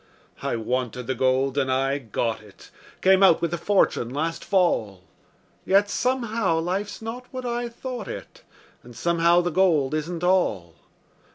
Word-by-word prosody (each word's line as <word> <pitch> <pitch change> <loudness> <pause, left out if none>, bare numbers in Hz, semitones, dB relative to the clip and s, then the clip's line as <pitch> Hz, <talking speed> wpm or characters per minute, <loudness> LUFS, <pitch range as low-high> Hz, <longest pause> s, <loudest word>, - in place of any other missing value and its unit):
I - - -1
wanted 125 +1 -3
the 130 - -1
gold, 130 +2 +1
and 130 -1 0
I 135 +2 +1
got 115 -2 -2
it 105 -2 -17 0.3
Came 190 +1 +5
out 190 -4 +6
with 170 0 -2
a - - 0
fortune 190 - +1
last 155 +5 -3
fall, 110 - +1 0.6
Yet 200 +1 +3
somehow 230 -8 0
life's 190 +6 -3
not 245 +3 -6
what 255 -1 -6
I 240 0 -2
thought 245 -1 -7
it, - - -8 0.4
And 120 0 -14
somehow 170 +4 +3
the 175 0 -2
gold 160 -6 +2
isn't 165 +2 -3
all. 110 - +1
170 Hz, 155 wpm, -24 LUFS, 130-195 Hz, 0.6 s, out